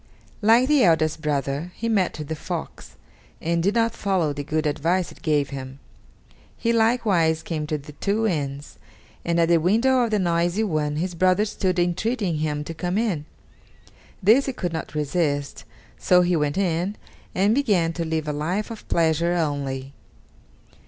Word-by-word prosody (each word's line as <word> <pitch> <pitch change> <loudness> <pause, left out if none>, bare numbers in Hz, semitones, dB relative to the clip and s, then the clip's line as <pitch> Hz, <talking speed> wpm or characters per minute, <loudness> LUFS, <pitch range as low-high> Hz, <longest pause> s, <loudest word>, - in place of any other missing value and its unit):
Like 230 +4 +5
the 295 -3 +4
eldest 160 -2 +2
brother, 145 +2 -2
he 230 - -3
met 200 -7 +1
with 150 -1 -6
the 160 - -3
fox, - - -7 0.4
and 170 +1 0
did 200 +5 +1
not 230 -1 +2
follow 185 -7 0
the 145 0 -5
good 155 +2 -1
advice 165 +5 0
it - - -16
gave 150 -3 +1
him. 135 -1 -7 0.8
He 230 0 0
likewise 210 -9 +2
came 155 -3 -3
to 155 - -1
the 150 +1 -11
two 205 +8 -1
inns, 145 -7 -3 0.4
and 170 0 0
at 165 - +4
the 170 -1 +4
window 230 +9 +3
of 235 - 0
the 215 - +1
noisy 175 +2 +1
one 155 -7 -1
his 175 +4 -2
brother 185 +4 +3
stood 185 -3 -1
entreating 180 +1 0
him 150 -1 -2
to 165 - -6
come 180 +3 -2
in. 200 -10 -1 1.0
This 230 +9 +5
he 270 - -1
could 175 -8 -3
not 160 -1 -5
resist, 145 -1 -1 0.3
so 180 0 +4
he 175 0 +2
went 150 -1 0
in, 185 +1 0 0.4
and 200 +4 +3
began 200 -11 +2
to 170 - -3
live 160 -1 -2
a 150 - -1
life 180 +10 -2
of 225 - -9
pleasure 165 +1 +2
only. 140 -5 -2
170 Hz, 170 wpm, -23 LUFS, 150-200 Hz, 1.0 s, Like